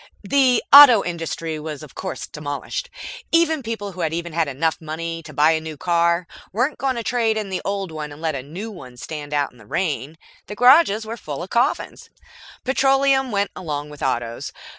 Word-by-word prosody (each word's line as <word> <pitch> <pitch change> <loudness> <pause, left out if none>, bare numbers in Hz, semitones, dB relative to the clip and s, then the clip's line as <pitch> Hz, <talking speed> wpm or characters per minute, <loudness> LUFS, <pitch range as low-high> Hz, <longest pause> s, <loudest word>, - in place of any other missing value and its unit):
The 255 -1 +3
auto 280 -7 +10
industry 165 -2 -4
was 155 -1 -6
of 140 -4 -12
course 190 - -5
demolished. 150 - -5 0.4
Even 325 -2 +3
people 225 -4 -5
who 185 -1 -7
had 160 -2 0
enough 165 -2 -1
money 165 +1 -5
to 155 - -11
buy 150 +2 +4
a 160 -1 0
new 160 -1 -7
car 170 0 +1 0.3
weren't 250 +9 -1
going 265 -1 0
to 235 - -3
trade 225 -1 +1
in 210 -2 -3
the 185 -1 -3
old 195 -3 -3
one 150 -1 -6
and 145 - -11
let 160 0 -1
the 135 -3 -4
new 180 - -7
one 130 -11 -12
stand 145 +2 -7
out 145 -1 0
in 125 - -21
the 110 - -16
rain. 155 - -2 0.3
The 210 - -7
garages 245 -3 +5
were 225 +2 -6
full 150 -5 -6
of 185 - -10
coffins. 245 +5 -1 0.5
Petroleum 270 0 +2
went 200 -2 0
along 150 -4 -5
with 150 - -12
Autos. 120 -3 -2
170 Hz, 190 wpm, -21 LUFS, 150-230 Hz, 0.5 s, auto